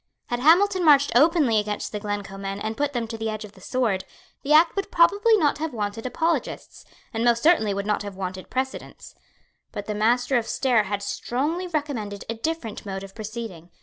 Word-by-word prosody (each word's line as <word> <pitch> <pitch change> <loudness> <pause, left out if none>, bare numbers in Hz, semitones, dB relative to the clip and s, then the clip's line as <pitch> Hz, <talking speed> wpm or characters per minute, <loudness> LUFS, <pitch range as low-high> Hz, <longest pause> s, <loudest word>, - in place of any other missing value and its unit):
Had 240 - -1
Hamilton 365 +7 +4
marched 290 -3 +5
openly 285 -4 +4
against 210 0 -3
the 210 - -4
Glencoe 205 -1 -4
men 195 0 -4
and 220 +1 -3
put 290 +2 -1
them 240 -2 -1
to 225 0 -7
the 225 0 -2
edge 215 0 -5
of 205 - -13
the 190 - -19
sword, 225 -5 0 0.4
the 285 - -3
act 320 +2 +6
would 395 0 -2
probably 405 +7 +4
not 295 -6 +1
have 310 -4 -3
wanted 210 +2 -3
apologists, 330 +6 -2 0.3
and 225 0 -1
most 235 -1 +3
certainly 305 -11 +4
would 200 0 -2
not 210 0 0
have 205 -2 -7
wanted 185 -1 -6
precedents. 265 +1 -5 0.6
But 205 - -6
the 210 - -3
Master 245 +5 +2
of 230 - -2
Stair 240 -6 +2
had 200 +1 -3
strongly 300 - -2
recommended 275 - -4
a 230 - -2
different 230 -2 -4
mode 195 -1 -5
of 195 0 -10
proceeding. 215 -6 -7
230 Hz, 200 wpm, -24 LUFS, 205-295 Hz, 0.6 s, act